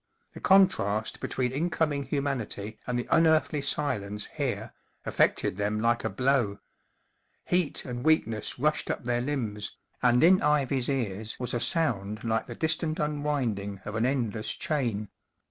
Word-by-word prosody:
The - - -9
contrast 110 - +3
between 125 -1 -1
incoming 150 -1 0
humanity 120 -7 -3
and 125 -1 0
the 120 - -3
unearthly 155 -3 +4
silence 105 -8 0
here - - -3 0.3
affected 90 - +1
them 105 +1 0
like 115 +1 +1
a - - 0
blow. 125 -6 +1 0.9
Heat 180 -4 +1
and 120 -1 -5
weak¬ 155 +1 +4
ness 110 -2 -4
rushed 150 +3 0
up - - -2
their 120 0 0
limbs, 115 -7 -3 0.2
and 125 +1 +4
in 185 +3 +6
Ivy's 140 -3 +1
ears 110 -5 -2
was 125 - -3
a 120 - 0
sound 110 - 0
like 115 -1 0
the - - -7
distant 160 0 -1
unwinding 135 -10 -1
of 105 - -5
an 110 +3 +1
endless 115 -5 -1
chain. 115 -9 -2
125 Hz, 145 wpm, -28 LUFS, 110-150 Hz, 0.9 s, in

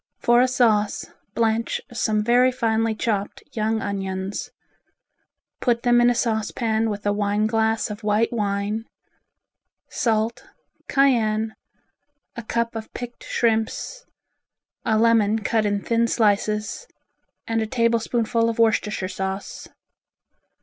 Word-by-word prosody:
For 240 +1 +4
a 255 - +4
sauce, 220 -5 +2 0.3
blanch 225 0 0
some 215 -2 0
very 245 +3 +4
finely 225 -2 0
chopped 210 -2 -2
young 220 0 -1
onions. 195 +3 -4 1.1
Put 235 -2 +1
them 240 0 +4
in 240 - +5
a 245 - +1
saucepan 225 -1 0
with 205 -1 -5
a 205 - +2
wine 205 +1 0
glass 220 0 +1
of 210 +2 -8
white 215 +3 +1
wine, 205 0 -1 1.1
salt, 225 0 0 0.4
cayenne, 225 -5 +2 0.8
a 235 - -5
cup 235 +1 -2
of 220 -1 -6
picked 245 -1 -7
shrimps, 230 - -1 0.8
a 220 -2 +2
lemon 220 -1 +3
cut 215 +1 +1
in 205 -1 -1
thin 230 0 +1
slices, 215 - 0 0.6
and 225 0 0
a 220 - -2
tablespoonful 230 -1 +1
of 230 - -3
Worcestershire 215 -4 +1
sauce. 190 +1 -5
220 Hz, 120 wpm, -23 LUFS, 210-235 Hz, 1.1 s, in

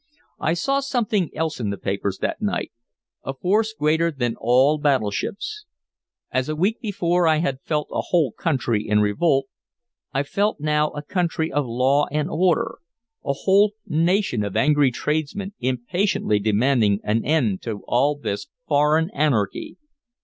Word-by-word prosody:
I 165 - +1
saw 275 +10 +1
something 225 - 0
else 160 -2 -2
in 110 -4 -2
the 100 - -3
papers 100 0 -2
that - - -2
night, 210 -1 -2 0.5
a 135 - -4
force 210 +8 +1
greater 160 -4 +1
than 120 -7 -2
all 130 +6 +3
battleships. 145 - -1 0.7
As 130 +2 -1
a 155 - -1
week 195 +8 0
before 180 -5 +1
I 155 -1 +4
had 140 -5 -1
felt 150 -1 -2
a - - -1
whole 160 -8 +2
country 120 -9 -1
in 105 0 +3
revolt, 135 +6 +2 0.7
I 135 - 0
felt 200 +8 -1
now 150 0 +1
a 145 - -7
country 165 -1 -1
of 145 -3 0
law 130 +5 +2
and 150 +1 -1
order, 185 +7 +1 0.4
a 140 - 0
whole 200 +2 +4
nation 170 - +1
of 100 -2 -3
angry 145 -1 +4
tradesmen 155 +10 -3
impatiently 130 - 0
demanding 110 0 +2
an 110 +2 0
end 130 -11 +1
to 110 -3 -5
all 140 +5 +2
this 140 -3 -4 0.2
"foreign 155 +3 +2
anarchy." 130 -10 -1
150 Hz, 150 wpm, -23 LUFS, 125-175 Hz, 0.7 s, I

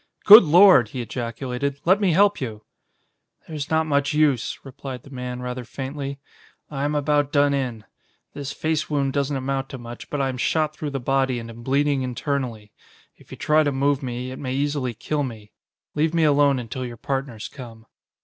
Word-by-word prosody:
"Good 215 +3 +12
Lord!" 170 - +6
he 125 +3 -5
ejaculated. 125 +4 -4
"Let 190 +4 +4
me 195 - +3
help 200 +1 +3
you." 110 -4 -5 0.8
"There's 150 -3 -5
not 160 0 +2
much 145 -1 0
use," 140 -8 +1
replied 130 -2 -8
the 140 - -15
man 125 -1 -5
rather 125 0 -4
faintly. 135 +3 -6 0.5
"I 140 -1 -2
am 150 +1 -1
about 145 -1 +1
done 145 -1 +3
in. 125 -6 -3 0.5
This 140 -1 -5
face 155 +1 -2
wound 140 -3 0
doesn't 140 0 0
amount 135 0 -3
to 130 - -7
much, 120 -1 -10
but 145 - -3
I 135 -1 +1
am 130 - -4
shot 155 +2 0
through 150 - -4
the 140 -1 -3
body 130 0 0
and 115 -1 -7
am 115 +1 -12
bleeding 140 +2 +1
internally. 125 -4 -3 0.4
If - - -22
you - - -9
try 155 +1 +3
to 145 -2 +1
move 140 +1 +1
me, 125 -1 -5
it 130 - -8
may 130 -2 -3
easily 140 -4 -1
kill 150 +6 -2
me. 110 -6 -6 0.4
Leave 155 +2 0
me 165 - +3
alone 145 -2 +4
until 125 +1 -5
your 120 -2 -7
partners 135 -4 -4
come." 115 -4 -11
135 Hz, 190 wpm, -23 LUFS, 125-145 Hz, 0.8 s, Good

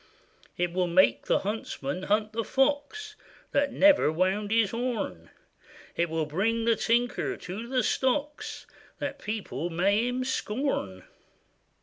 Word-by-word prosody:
It 175 -1 0
will 180 0 +1
make 185 +3 +3
the - - +3
huntsman 185 -7 -3
hunt 215 +1 +1
the 230 +1 -1
fox, 290 - 0 0.4
That 280 0 +2
never 290 - +5
wound 190 +5 0
his 225 -2 +3
horn; 230 - -3 0.7
It 170 0 +1
will 160 -1 -1
bring 220 +9 0
the 230 -1 +4
tinker 245 - 0
to 200 +6 -6
the 255 -1 +1
stocks, 290 +6 -1 0.3
That - - -4
people 190 - -4
may 200 +7 +2
him 250 +1 -1
scorn. 215 - -2
220 Hz, 130 wpm, -28 LUFS, 180-255 Hz, 0.7 s, never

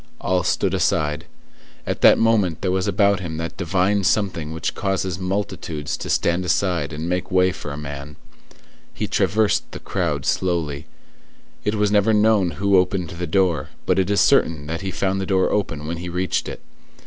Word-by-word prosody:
All 90 0 +1
stood - - 0
aside. 75 +1 0 0.6
At - - -3
that - - +7
moment 105 -7 +2
there 90 - 0
was 95 +1 0
about 100 0 +3
him 85 -4 -5
that 80 +1 -4
divine 95 +3 +1
something 90 -6 0
which 80 +1 -3
causes 95 -2 -2
multitudes 90 -5 -3
to - - -6
stand 85 +2 +1
aside 90 -5 0
and 80 +2 -5
make 90 +1 -2
way 95 -1 +3
for 75 -5 -7
a 70 - -6
man. 70 0 -7 0.8
He - - -2
traversed 110 0 +1
the - - -6
crowd 80 -7 -2
slowly. 85 -6 -1 0.8
It 105 +1 0
was 105 -1 +1
never 105 +1 +3
known 105 -3 +3
who 100 +1 +3
opened 90 -2 0
the 85 0 -5
door, 85 -5 +1 0.2
but 95 +1 +2
it 95 0 +1
is 100 - +3
certain 75 -3 +3
that 80 +2 -4
he 95 - -3
found 95 +1 -1
the 95 - -4
door 95 -2 +2
open 80 -8 -2
when 85 +2 -3
he 90 +1 -6
reached 90 +2 -1
it. - - -8
90 Hz, 185 wpm, -22 LUFS, 80-100 Hz, 0.8 s, that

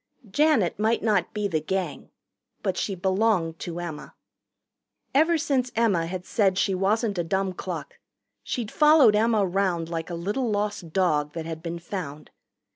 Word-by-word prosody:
Janet 275 - +2
might 220 +2 +1
not 205 -6 +1
be 210 -1 -1
the 165 -5 0
Gang. 190 +4 -3 0.5
But 190 -3 0
she 195 +1 -2
belonged 185 -3 +1
to 175 0 -5
Emma. 170 -4 -7 1.0
Ever 325 +4 +4
since 275 -6 0
Emma 200 -8 +2
had 180 +1 -5
said 195 -4 +1
she 195 0 +2
wasn't 200 +1 0
a - - +1
dumb 190 +2 -1
cluck - - -6 0.4
she'd 235 -5 -4
followed 300 -8 +6
Emma 215 -1 +3
round 180 -3 0
like 165 -1 -4
a 175 - -4
little 210 +9 -2
lost 205 -5 -2
dog 150 -5 +1
that 165 -1 -5
had 160 -1 -6
been 170 0 -4
found. 170 -4 -7
190 Hz, 160 wpm, -25 LUFS, 170-220 Hz, 1.0 s, followed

